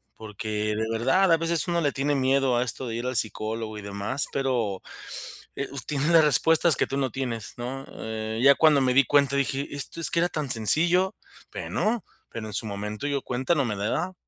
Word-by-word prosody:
Porque 105 0 -3
de 110 +1 -1
verdad 135 +12 +2
a 165 - +6
veces 165 +1 0
uno 170 -1 0
le 145 -3 +1
tiene 140 +2 -1
miedo 135 -1 +2
a 120 - +2
esto 125 +1 -3
de 115 - -4
ir 120 +2 -3
al 125 - -3
psicólogo 110 0 -1
y - - -8
demás, 100 +7 0
pero, 120 -8 -1 0.7
eh, 140 - -4
uh, 140 - -8
tiene 150 +1 0
las 165 -2 +6
respuestas 160 +3 +4
que - - 0
tú 135 - -3
no 135 -2 0
tienes, 115 -3 -4
¿no? 130 +3 -5
Eh, 110 0 -5
ya 140 +1 +7
cuando 155 -3 +5
me 130 -1 +2
di 135 +1 +5
cuenta 140 0 +3
dije: 140 +1 -1
"Esto, 145 +3 -4
es - - +3
que - - +1
era 175 - +3
tan 150 -5 -3
sencillo", 170 - +2 0.4
bueno, 220 0 -1 0.3
pero 110 -2 -6
en 105 - -8
su 105 - -2
momento 105 +5 -4
yo 140 -1 -1
cuenta 130 +7 -1
no 140 - +2
me 110 -5 -2
daba. 115 - -2
135 Hz, 215 wpm, -26 LUFS, 110-145 Hz, 0.7 s, ya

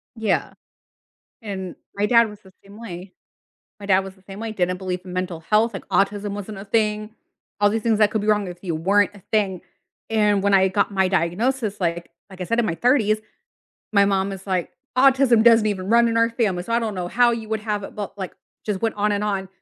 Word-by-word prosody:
Yeah. 220 -4 -1 0.9
And 190 -4 -6 0.2
my 200 +1 +1
dad 230 0 +4
was 210 -1 -12
the 190 -1 -19
same 200 +2 -14
way. 185 -4 -9 0.7
My 200 - -8
dad 190 -1 +4
was 190 0 -8
the 190 - -24
same 195 +2 -10
way, 225 -1 -4
didn't 180 -3 -1
believe 185 -1 -3
in 185 - -9
mental 180 -2 -3
health, 215 +7 +2
like, 195 - -7
autism 205 +1 0
wasn't 205 0 -6
a 195 - -8
thing. 215 0 -1 0.5
All 205 0 +4
these 220 +1 -1
things 225 -2 +2
that 210 -1 +4
could 220 - -1
be 205 - -4
wrong 210 -1 +3
with 175 -1 -9
you 170 -3 -2
weren't 200 +6 +2
a 200 - -15
thing. 195 -5 +1 0.5
And 210 -2 +2
when 200 0 +3
I 190 0 +5
got 200 +2 0
my 190 -1 +2
diagnosis, 205 +6 0
like 170 -1 -2 0.2
like 190 -1 -13
I - - -2
said, 230 +6 -1
in 225 - 0
my 165 - -1
30s, 225 -3 +3 0.7
my 200 -1 +5
mom 195 0 +1
is 195 0 -9
like, 185 -3 -1 0.3
"Autism 260 -3 +5
doesn't 230 -2 +6
even 195 -2 -2
run 235 +1 +5
in 230 - -1
our 230 0 +3
family, 210 -7 0
so 230 - -5
I - - +4
don't 225 -3 -3
know 180 -2 -3
how 240 +4 +4
you 225 -2 -5
would 220 0 -2
have 210 -1 -2
it," - - -9
but 205 -1 -6
like, 190 -2 -5 0.3
just 210 -2 -2
went 225 -1 0
on 210 +1 +1
and 205 0 -1
on, 195 -2 -2
205 Hz, 230 wpm, -22 LUFS, 190-220 Hz, 0.9 s, doesn't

